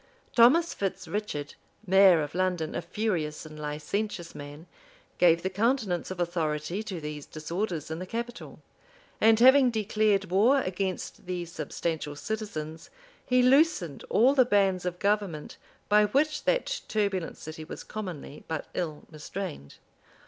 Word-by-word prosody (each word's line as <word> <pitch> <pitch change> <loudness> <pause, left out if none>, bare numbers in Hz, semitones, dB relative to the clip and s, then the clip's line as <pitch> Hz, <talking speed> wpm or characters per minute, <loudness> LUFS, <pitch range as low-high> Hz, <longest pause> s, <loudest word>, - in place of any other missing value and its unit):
Thomas 280 +9 +6
Fitz 190 -1 -3
Richard, 175 -9 -4 0.3
mayor 190 -4 +6
of 145 - -6
London, 180 -3 -1
a - - -2
furious 170 -5 -2
and 155 -1 -10
licentious 170 +5 -3
man, 145 +3 -9 0.5
gave 170 -1 +5
the 190 - 0
countenance 210 -3 0
of 185 -1 -6
authority 170 +1 -1
to 195 -5 -5
these 150 -1 -6
disorders 165 +1 -4
in 160 - -4
the 185 - -6
capital; 235 +3 -6 0.6
and 225 0 +6
having 260 +1 +7
declared 215 -3 +1
war 230 +9 +5
against 185 -2 -4
the 180 -1 -3
substantial 160 -1 -4
citizens, 160 -5 -5 0.4
he 250 0 +4
loosened 260 - +3
all 250 +5 +5
the 265 -2 +6
bands 195 -5 +2
of 180 0 -3
government, 200 -6 -1 0.3
by 210 0 +5
which 295 +7 0
that - - 0
turbulent 200 -5 -1
city 155 0 -8
was 155 - -8
commonly 180 -9 -7
but 160 -2 -3
ill 155 -4 -3
restrained. 155 - -7
185 Hz, 140 wpm, -28 LUFS, 160-215 Hz, 0.6 s, having